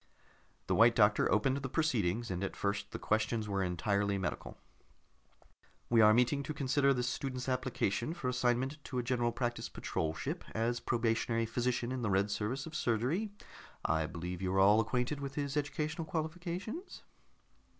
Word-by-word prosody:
The -, -, 0 dB
White 115 Hz, +1 st, +6 dB
Doctor 105 Hz, -2 st, +4 dB
opened 130 Hz, +6 st, +2 dB
the 135 Hz, -1 st, -4 dB
proceedings, 120 Hz, -, 0 dB
and 90 Hz, +1 st, -2 dB
at 100 Hz, -, -3 dB
first 100 Hz, 0 st, -2 dB
the -, -, -5 dB
questions 110 Hz, 0 st, 0 dB
were 100 Hz, -1 st, 0 dB
entirely 100 Hz, +3 st, 0 dB
medical. 90 Hz, -6 st, -4 dB, 1.3 s
"We 115 Hz, -1 st, +6 dB
are 105 Hz, 0 st, +8 dB
meeting 125 Hz, +5 st, +3 dB
to 150 Hz, +2 st, -5 dB
consider 140 Hz, 0 st, +2 dB
this 125 Hz, -2 st, 0 dB
student's 130 Hz, 0 st, -3 dB
application 130 Hz, -, -1 dB
for 130 Hz, -, -4 dB
assignment 125 Hz, +3 st, 0 dB
to 130 Hz, -, -4 dB
a 125 Hz, -, 0 dB
General 120 Hz, -1 st, +1 dB
Practice 120 Hz, 0 st, -2 dB
Patrol 80 Hz, 0 st, -2 dB
ship, -, -, -4 dB
as 115 Hz, +2 st, 0 dB
a -, -, -22 dB
probationary 115 Hz, 0 st, 0 dB
physician 120 Hz, +1 st, -1 dB
in 130 Hz, -1 st, -2 dB
the 115 Hz, -, 0 dB
Red 100 Hz, +1 st, +2 dB
Service 115 Hz, +7 st, -2 dB
of 160 Hz, -, -9 dB
Surgery. 130 Hz, -, 0 dB, 0.6 s
I 80 Hz, -1 st, +1 dB
believe 90 Hz, +1 st, -5 dB
you 95 Hz, -1 st, -1 dB
are -, -, +3 dB
all 105 Hz, +3 st, +6 dB
acquainted 125 Hz, +5 st, -1 dB
with 140 Hz, -1 st, -5 dB
his 145 Hz, -1 st, -2 dB
educational 150 Hz, +3 st, -2 dB
qualifications?" 175 Hz, -, -4 dB
120 Hz, 170 wpm, -33 LUFS, 105-140 Hz, 1.3 s, are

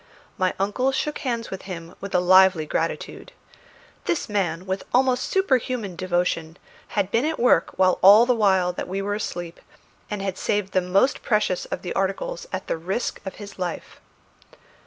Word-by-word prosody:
My 185 Hz, -1 st, 0 dB
uncle 210 Hz, +7 st, +1 dB
shook 300 Hz, +2 st, -2 dB
hands 235 Hz, -3 st, -3 dB
with 190 Hz, -, -5 dB
him 170 Hz, -2 st, -7 dB
with 200 Hz, -1 st, -5 dB
a -, -, +5 dB
lively 185 Hz, -2 st, +5 dB
gratitude. -, -, -4 dB, 0.7 s
This 340 Hz, -, -1 dB
man, 185 Hz, -5 st, -1 dB
with 190 Hz, 0 st, -3 dB
almost 255 Hz, 0 st, +2 dB
superhuman 255 Hz, -, 0 dB
devotion, 175 Hz, -2 st, -1 dB, 0.4 s
had 200 Hz, -1 st, +1 dB
been 230 Hz, -, +2 dB
at 315 Hz, +2 st, -1 dB
work 250 Hz, +1 st, +3 dB
all 190 Hz, +4 st, +6 dB
the 250 Hz, -, +3 dB
while 190 Hz, -5 st, +2 dB
that -, -, -5 dB
we 190 Hz, +2 st, -3 dB
were 205 Hz, +1 st, -1 dB
asleep, 175 Hz, -5 st, -5 dB, 0.5 s
and 210 Hz, -, -3 dB
had 195 Hz, -2 st, -3 dB
saved 205 Hz, -2 st, -1 dB
the 185 Hz, -, +3 dB
most 195 Hz, +9 st, +2 dB
precious 210 Hz, -5 st, 0 dB
of -, -, -5 dB
the 180 Hz, -, -4 dB
articles 195 Hz, -, -2 dB
at -, -, -4 dB
the -, -, -2 dB
risk 190 Hz, +8 st, -3 dB
of 190 Hz, -, -5 dB
his 205 Hz, -2 st, -11 dB
life. 180 Hz, -2 st, -5 dB
195 Hz, 170 wpm, -24 LUFS, 180-235 Hz, 0.7 s, all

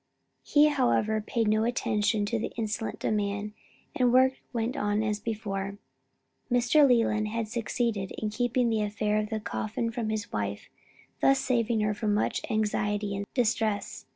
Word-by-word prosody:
He 300 Hz, +1 st, +4 dB
however 230 Hz, -6 st, +1 dB
paid 225 Hz, +1 st, -1 dB
no 215 Hz, +1 st, +3 dB
attention 215 Hz, -3 st, +1 dB
to 225 Hz, +2 st, -1 dB
the 220 Hz, -, -3 dB
insolent 220 Hz, -1 st, -3 dB
demand, 205 Hz, 0 st, -1 dB, 0.4 s
and 250 Hz, -, +3 dB
the -, -, +3 dB
work 260 Hz, +1 st, +5 dB, 0.2 s
went 235 Hz, 0 st, -2 dB
on 205 Hz, +1 st, 0 dB
as 210 Hz, -1 st, -1 dB
before. 200 Hz, -3 st, -4 dB, 0.7 s
Mr. 245 Hz, +5 st, +5 dB
Leland 225 Hz, -4 st, +2 dB
had 225 Hz, +1 st, -2 dB
succeeded 225 Hz, -3 st, -2 dB
in 215 Hz, -1 st, -2 dB
keeping 245 Hz, +1 st, +1 dB
the 220 Hz, -1 st, +1 dB
affair 210 Hz, 0 st, 0 dB
of 210 Hz, 0 st, -3 dB
the 220 Hz, -, -2 dB
coffin 220 Hz, +2 st, -3 dB
from 230 Hz, -2 st, -3 dB
his 215 Hz, -2 st, -3 dB
wife 100 Hz, 0 st, -3 dB, 0.5 s
thus 275 Hz, 0 st, +4 dB
saving 235 Hz, -4 st, +1 dB
her 210 Hz, +1 st, -1 dB
much 210 Hz, 0 st, +1 dB
anxiety 210 Hz, -1 st, 0 dB
and 200 Hz, +1 st, -4 dB
distress. 220 Hz, -4 st, 0 dB
215 Hz, 155 wpm, -28 LUFS, 210-235 Hz, 0.7 s, work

